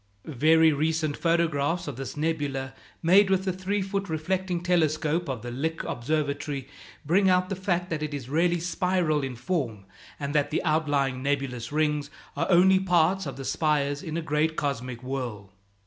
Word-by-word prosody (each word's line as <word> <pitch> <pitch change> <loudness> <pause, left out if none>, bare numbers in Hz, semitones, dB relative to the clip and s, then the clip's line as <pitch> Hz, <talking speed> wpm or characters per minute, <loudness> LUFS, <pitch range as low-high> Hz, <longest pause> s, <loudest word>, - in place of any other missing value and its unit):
Very 160 +3 +4
recent 155 0 0
photographs 165 -1 +1
of 145 - -4
this 135 +2 -6
nebula, 145 -4 -2 0.3
made 190 +4 +6
with 190 0 +1
the 190 - 0
three 190 +2 -1
foot 195 0 -3
reflecting 175 +2 -2
telescope 160 -2 +1
of 125 -4 -4
the 120 - -5
Lick 160 +6 -2
Observatory, 140 0 -2 0.4
bring 190 +6 +3
out 185 0 +3
the 195 - -2
fact 180 -1 -1
that 155 -2 -2
it 155 0 -3
is 140 -4 -5
really 170 +5 +2
spiral 175 -3 0
in 135 -2 -4
form, 120 - -3 0.3
and 140 -1 -3
that 145 -1 +2
the - - -1
outlying 145 -5 +1
nebulous 135 -4 -2
rings 150 -1 0 0.3
are - - -1
only 190 +1 +6
parts 180 -1 +2
of 135 - -5
the 135 - -6
spires 145 -2 0
in 160 0 -4
a 170 - -3
great 155 +1 0
cosmic 125 -4 -3
whorl. 120 -7 -5
155 Hz, 170 wpm, -26 LUFS, 140-175 Hz, 0.4 s, made